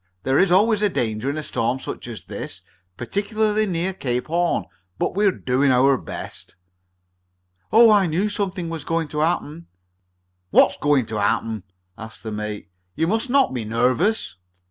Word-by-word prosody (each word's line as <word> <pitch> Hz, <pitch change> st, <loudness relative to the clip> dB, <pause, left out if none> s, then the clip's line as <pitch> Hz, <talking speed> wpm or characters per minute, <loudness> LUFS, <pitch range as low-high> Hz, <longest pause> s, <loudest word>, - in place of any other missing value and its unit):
There 135 Hz, +1 st, +2 dB
is 190 Hz, -2 st, +3 dB
always 210 Hz, +3 st, +4 dB
danger 120 Hz, -, -1 dB
in 145 Hz, -, -3 dB
a 155 Hz, -, -3 dB
storm 125 Hz, -2 st, -1 dB
such -, -, -7 dB
as 110 Hz, -6 st, -8 dB
this -, -, -6 dB
is, -, -, -11 dB, 0.4 s
particularly 210 Hz, -, 0 dB
near 180 Hz, +1 st, -1 dB
Cape 125 Hz, -8 st, -2 dB
Horn. 170 Hz, +2 st, 0 dB, 0.3 s
But -, -, -1 dB
we're 200 Hz, +1 st, +3 dB
doing 135 Hz, -4 st, 0 dB
our 135 Hz, +2 st, +4 dB
best." 95 Hz, -6 st, -8 dB, 1.2 s
"Oh! 225 Hz, +1 st, +7 dB
I 200 Hz, -3 st, +4 dB
knew 175 Hz, +6 st, 0 dB
something 195 Hz, -4 st, -2 dB
was 165 Hz, -2 st, -5 dB
going 165 Hz, -1 st, -1 dB
to 150 Hz, -, -4 dB
happen!" 165 Hz, 0 st, -1 dB, 0.8 s
"What's -, -, +4 dB
going 145 Hz, -4 st, +2 dB
to 110 Hz, -1 st, -4 dB
happen?" 110 Hz, -1 st, -1 dB, 0.3 s
asked 110 Hz, 0 st, -10 dB
the 110 Hz, -, -5 dB
mate. 105 Hz, -2 st, -5 dB, 0.2 s
"You 160 Hz, -, +1 dB
must 220 Hz, +8 st, 0 dB
not 270 Hz, -, +3 dB
be 125 Hz, -, -2 dB
so 105 Hz, -, -8 dB
nervous." 125 Hz, -, +1 dB
155 Hz, 165 wpm, -22 LUFS, 120-200 Hz, 1.2 s, Oh